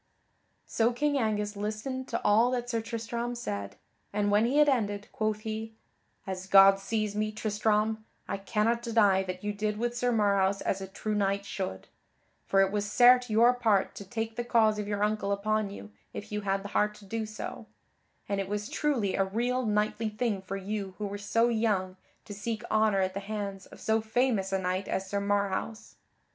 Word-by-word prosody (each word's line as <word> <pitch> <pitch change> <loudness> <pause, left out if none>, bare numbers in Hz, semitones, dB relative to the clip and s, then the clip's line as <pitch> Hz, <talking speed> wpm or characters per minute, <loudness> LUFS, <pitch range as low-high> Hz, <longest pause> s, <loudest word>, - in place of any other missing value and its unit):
So 230 +1 +1
King 285 +4 0
Angus 210 -2 -1
listened 215 +6 -4
to - - -2
all 220 +4 +4
that 245 -1 -2
Sir 230 -1 0
Tristram 235 +1 -4
said, 100 - -5 0.4
and 205 0 0
when 210 +2 +4
he 270 +4 +1
had 300 0 +6
ended, 205 -6 0
quoth 215 -1 -1
he: 220 0 -5 0.5
"As 190 -1 -5
God 195 0 +7
sees 215 0 -2
me, 215 0 0
Tristram, 215 0 0 0.2
I 200 - -2
cannot 220 +3 0
deny 215 -5 +3
that 185 0 -6
you 210 0 -1
did 210 +1 -2
with 240 +2 -1
Sir 245 0 +1
Marhaus 200 -3 +2
as 195 - -1
a 190 - -5
true 210 +2 -4
knight 200 -1 0
should. 190 -2 -5 0.6
For 195 - +4
it 190 - 0
was 205 0 -2
certes 250 +1 +6
your 230 +3 +5
part 220 -6 +1
to - - -8
take 225 +2 -4
the 240 - -1
cause 220 -3 +3
of 210 - -3
your 205 0 -1
uncle 210 -1 0
upon 215 +1 0
you 205 +1 -10 0.2
if 210 +1 -7
you 210 0 -2
had 195 -1 -1
the 200 - -6
heart 210 +1 +1
to 210 - -15
do 220 +2 -3
so, 215 0 -7 0.6
and 200 -1 -1
it 195 - -5
was 210 +1 -3
truly 250 -10 0
a 195 - +2
real 240 +5 -1
knightly 215 +1 0
thing 215 -2 -1
for 190 +1 -5
you 195 -1 -4
who 210 - -3
were 200 0 -5
so 230 +3 +2
young 210 -5 0 0.3
to 205 - -8
seek 215 +2 -4
honor 215 -2 +3
at 185 0 0
the 200 - -3
hands 200 -2 -5
of - - -14
so 220 0 +1
famous 220 -3 0
a 195 - +2
knight 185 +1 -2
as 190 0 -2
Sir 200 +1 -1
Marhaus. 205 +2 -2
210 Hz, 200 wpm, -29 LUFS, 200-225 Hz, 0.6 s, God